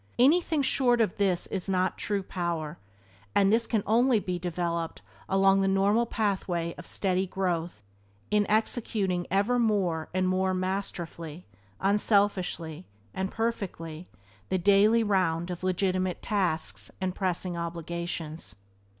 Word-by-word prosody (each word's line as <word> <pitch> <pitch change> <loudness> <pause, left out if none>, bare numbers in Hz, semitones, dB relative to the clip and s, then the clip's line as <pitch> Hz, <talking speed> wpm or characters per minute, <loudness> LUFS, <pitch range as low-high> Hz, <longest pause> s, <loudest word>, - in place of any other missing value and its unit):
Anything 310 +3 +4
short 245 -2 +2
of 215 -5 +1
this 190 -3 +1
is 195 0 -3
not 185 -1 +1
true 200 -2 -2
power, 170 -4 -3 0.6
and 200 +1 +4
this 230 +1 +2
can 220 -4 0
only 235 +2 +4
be 180 -3 -3
developed 170 -1 -3 0.3
along 195 0 +4
the 195 - +2
normal 200 +4 +3
pathway 185 -6 -1
of 180 - -10
steady 190 -1 0
growth 175 - -2 0.5
in 210 -1 +2
executing 210 -4 0
ever 205 +6 +2
more 190 -8 +1
and 185 0 +1
more 185 0 +1
masterfully, 180 -3 -4 0.3
unselfishly, 195 -5 +1 0.3
and 190 0 -2
perfectly 185 -8 -3 0.4
the 190 - +1
daily 205 +5 +4
round 180 -4 +1
of 175 - -6
legitimate 185 -1 0
tasks 160 - +1
and 185 -1 -1
pressing 185 -1 -1
obligations. 170 - -5
185 Hz, 125 wpm, -28 LUFS, 170-205 Hz, 0.6 s, Anything